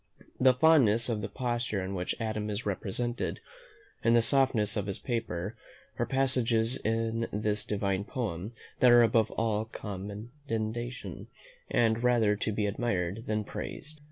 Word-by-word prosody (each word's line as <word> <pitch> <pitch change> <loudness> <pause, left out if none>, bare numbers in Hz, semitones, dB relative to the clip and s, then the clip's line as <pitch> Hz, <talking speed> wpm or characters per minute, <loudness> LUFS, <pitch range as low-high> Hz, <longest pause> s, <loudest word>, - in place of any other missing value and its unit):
The 130 -1 +5
fondness 125 -6 +4
of 110 -3 -1
the 100 - -4
posture 120 -5 -2
in 95 +1 -4
which 90 +3 -3
Adam 110 -2 -2
is 105 +2 -3
represented, 120 +4 -2 0.6
and 115 +1 +4
the 115 - +5
softness 115 -5 +3
of 100 -2 -2
his 100 - -4
whisper, 115 -4 -3 0.4
are - - +1
passages 125 -3 +3
in 115 +1 -1
this 105 0 -1
divine 100 -1 -1
poem 105 -7 -3 0.3
that 125 - +6
are 120 0 +8
above 115 -2 +3
all 110 -1 -1
commendation, 110 +3 -5 0.4
and 115 -2 +2
rather 115 -4 +3
to 105 - -2
be 105 0 -1
admired 100 -1 -2
than 110 0 0
praised. 155 +8 -7
110 Hz, 145 wpm, -30 LUFS, 105-120 Hz, 0.6 s, are